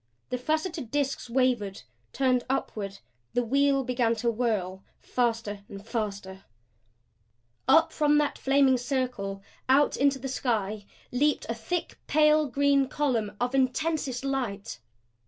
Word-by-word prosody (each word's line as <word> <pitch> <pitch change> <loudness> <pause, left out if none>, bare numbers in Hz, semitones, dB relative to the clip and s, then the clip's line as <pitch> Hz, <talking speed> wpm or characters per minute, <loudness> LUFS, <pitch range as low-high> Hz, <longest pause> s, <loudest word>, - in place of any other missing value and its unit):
The 250 - -1
faceted 310 0 -2
disks 275 -2 -1
wavered; 240 -6 0 0.3
turned 255 -2 +2
upward; 205 -7 -2 0.4
the 245 - +2
wheel 275 +2 +2
began 240 -2 +1
to 235 +1 0
whirl 205 -5 -1 0.2
faster 230 -4 -1 0.2
faster 200 -4 -4 1.2
Up 320 +5 +5
from 295 -1 +3
that 295 -1 0
flaming 270 -1 +4
circle, 245 -7 -2 0.3
out 280 +2 +4
into 280 0 +2
the 270 +1 -5
sky 215 -6 -2 0.2
leaped 290 +4 +1
a - - +1
thick, 235 +10 -4
pale 305 0 +4
green 280 +1 +2
column 235 -9 -1
of 245 +1 -1
intensest 270 0 0
light. 235 - -3
255 Hz, 120 wpm, -27 LUFS, 225-280 Hz, 1.2 s, Up